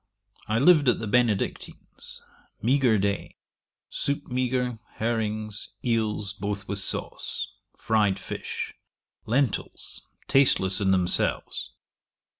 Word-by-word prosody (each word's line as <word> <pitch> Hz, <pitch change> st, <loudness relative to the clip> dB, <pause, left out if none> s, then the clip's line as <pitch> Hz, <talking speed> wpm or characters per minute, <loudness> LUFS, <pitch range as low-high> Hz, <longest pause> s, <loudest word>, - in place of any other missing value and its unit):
I 110 Hz, +1 st, +1 dB
lived 145 Hz, 0 st, +6 dB
at -, -, +3 dB
the 110 Hz, -, -4 dB
Benedictines; 115 Hz, -2 st, -1 dB, 0.4 s
meagre 125 Hz, -1 st, +3 dB
day; 100 Hz, 0 st, -2 dB, 0.6 s
soup 140 Hz, 0 st, -2 dB
meagre, 125 Hz, -2 st, -1 dB, 0.2 s
herrings, 110 Hz, -2 st, -2 dB
eels, 110 Hz, -4 st, 0 dB
both 100 Hz, 0 st, -4 dB
with 100 Hz, 0 st, -2 dB
sauce; 100 Hz, -, -1 dB, 0.2 s
fryed 105 Hz, -3 st, +2 dB
fish; -, -, -5 dB, 0.5 s
lentils, 125 Hz, 0 st, -1 dB, 0.3 s
tasteless 115 Hz, -9 st, +5 dB
in 95 Hz, -, +2 dB
themselves. 90 Hz, -2 st, +1 dB
110 Hz, 95 wpm, -26 LUFS, 100-125 Hz, 0.6 s, lived